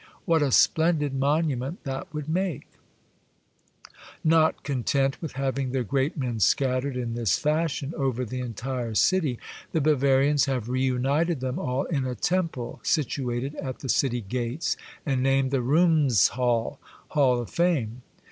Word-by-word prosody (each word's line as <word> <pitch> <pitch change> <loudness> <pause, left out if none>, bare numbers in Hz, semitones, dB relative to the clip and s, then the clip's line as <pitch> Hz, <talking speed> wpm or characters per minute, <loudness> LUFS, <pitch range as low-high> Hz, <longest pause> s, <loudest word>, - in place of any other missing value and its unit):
What 165 -3 +3
a 140 -2 +1
splendid 160 0 +3
monument 140 +1 0
that 135 -1 -5
would 150 -2 -5
make! 175 -2 -1 1.6
Not 160 0 +3
content 135 0 0
with 160 - -5
having 135 0 -2
their 130 -2 0
great 135 - -1
men 125 -5 -2
scat 130 +4 +2
tered 140 -1 -4
in 120 -2 -3
this 115 -6 +1
fashion 155 -1 -1
over 130 -3 -1
the 125 +3 -5
entire 120 0 -4
city, 155 - +2 0.4
the 160 - +2
Bavarians 140 -1 +3
have 125 -4 -2
reunited 130 +5 +1
them 130 +5 -3
all 130 -7 -1
in 140 -6 -2
a 125 - -3
Temple 165 - -2
situated 135 -2 -1
at 130 -2 -5
the 135 - -6
city 125 -1 +1
gates, 120 +7 -2 0.3
and 135 -4 0
named 135 0 +2
the 135 -2 +1
Ruhmes 145 - +4
halle 120 +1 -1 0.3
(Hall 130 -5 +3
of 120 - -6
Fame). 135 -10 0
135 Hz, 145 wpm, -26 LUFS, 125-150 Hz, 1.6 s, Ruhmes